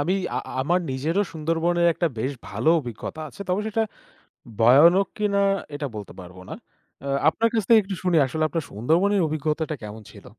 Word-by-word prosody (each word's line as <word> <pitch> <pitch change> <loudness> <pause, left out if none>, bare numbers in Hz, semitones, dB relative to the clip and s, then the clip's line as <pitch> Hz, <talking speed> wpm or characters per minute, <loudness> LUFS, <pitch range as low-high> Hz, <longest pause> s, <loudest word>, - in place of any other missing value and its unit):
আমি 170 +6 0 0.2
আ - - +1 0.2
আমার 170 +7 +2
নিজেরও 155 +9 0
সুন্দরবনের 165 +2 0
একটা 170 - 0
বেশ 130 +5 -1 0.2
ভালো 110 +9 -1
অভিজ্ঞতা 125 +4 -7
আছে 200 - -17
তবে 180 +3 +1
সেটা 225 +1 0 0.8
ভয়ানক 160 +12 +6
কিনা 205 -1 +1 0.4
এটা 145 0 -3
বলতে 105 -2 -7
পারব 90 0 -12
না। - - -7 0.5
অ্যা 140 - -7 0.2
আপনার 230 +7 +2
কাছ 220 - +2
থেকে 230 -2 +7
একটু 195 0 -5
শুনি 180 -2 +2
আসলে 155 +5 -3
আপনার 165 +2 -2
সুন্দরবনের 170 - +1
অভিজ্ঞতাটা 155 +1 -2
কেমন 105 +1 -8
ছিল? - - -15
160 Hz, 175 wpm, -24 LUFS, 130-185 Hz, 0.8 s, থেকে